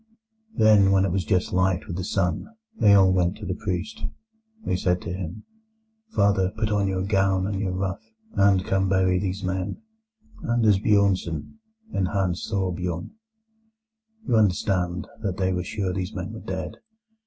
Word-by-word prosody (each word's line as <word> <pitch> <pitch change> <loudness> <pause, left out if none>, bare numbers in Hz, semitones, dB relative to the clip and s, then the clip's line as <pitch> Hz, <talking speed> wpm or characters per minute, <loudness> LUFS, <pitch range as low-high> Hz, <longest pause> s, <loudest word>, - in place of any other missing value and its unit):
"Then, 105 -3 +5
when 95 0 +4
it 95 - -1
was 95 +1 0
just 90 - 0
light 90 0 +1
with 85 - -5
the 90 - -3
sun, 90 -3 -1 0.3
they 105 - +5
all 95 -1 +5
went 90 0 +1
to 105 - -8
the 90 - -2
priest. 95 +1 -4 0.6
They - - 0
said 90 0 +1
to 85 - -4
him: 95 +3 -6 0.7
"'Father, 100 -3 +3
put 110 -1 0
on 100 -1 +2
your 95 -1 -1
gown 95 -1 +2
and 100 -1 -2
your 95 -2 -1
ruff, 95 0 -2 0.3
and 100 -2 +3
come 95 0 +1
to - - -1
bury 95 -1 +3
these 95 0 -3
men, 95 - -2 0.7
Anders 110 -4 +4
Bjornsen 100 - +1 0.3
and 95 - +1
Hans 90 -3 -1
Thorbjorn.' 90 -4 -2 1.2
"You 115 - +3
understand 90 -3 +1
that 100 -4 -2
they 95 -1 +1
were 90 0 -1
sure 95 -1 -2
these 95 +3 -4
men 95 +3 -5
were 110 - -7
dead. 95 -3 -5
95 Hz, 165 wpm, -25 LUFS, 90-100 Hz, 1.2 s, Then